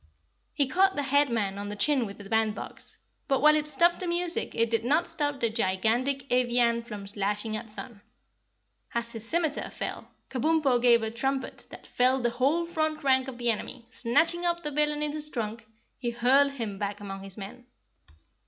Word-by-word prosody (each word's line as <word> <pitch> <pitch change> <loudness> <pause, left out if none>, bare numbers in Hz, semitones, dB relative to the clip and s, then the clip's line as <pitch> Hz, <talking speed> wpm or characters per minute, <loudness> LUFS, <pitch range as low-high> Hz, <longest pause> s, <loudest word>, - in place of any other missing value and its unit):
He 285 - +3
caught 380 +8 +3
the 285 - -1
Headman 235 -8 +1
on 205 - -5
the 205 - -4
chin 255 +3 +2
with 200 - -9
the 205 - -10
bandbox, 220 0 -2 0.3
but 270 -2 +2
while 305 +1 +6
it 300 0 +1
stopped 345 +3 +3
the 365 - -4
music 345 0 -1
it 230 0 +1
did 230 -1 +1
not 305 +8 +2
stop 290 -4 -2
the 230 -3 +1
gigantic 230 +6 0
Evian 240 -1 +3
from 210 -4 -8
slashing 205 +2 -2
at 220 - -6
Thun. 215 0 -10 0.9
As 235 0 -1
his 225 -2 -6
scimiter 320 -3 0
fell, - - -6 0.2
Kabumpo 270 -2 +2
gave 235 -2 +5
a 220 - -2
trumpet 265 +3 -3
that - - -12
felled 255 +1 +2
the 240 - +2
whole 280 +8 +1
front 315 -2 -2
rank 260 -1 +3
of 260 -2 -7
the 240 -1 +2
enemy, 235 +3 -6
and - - -29
snatching 330 +9 +2
up 345 0 0
the 300 - -3
villain 300 +1 +1
in 300 - -1
his 300 0 0
trunk, 225 -3 -4 0.3
he 245 - -1
hurled 265 +4 +3
him 220 -7 -5
back 205 0 -3
among 195 -1 -7
his 195 0 -10
men. 215 +5 -9
250 Hz, 190 wpm, -28 LUFS, 225-295 Hz, 0.9 s, while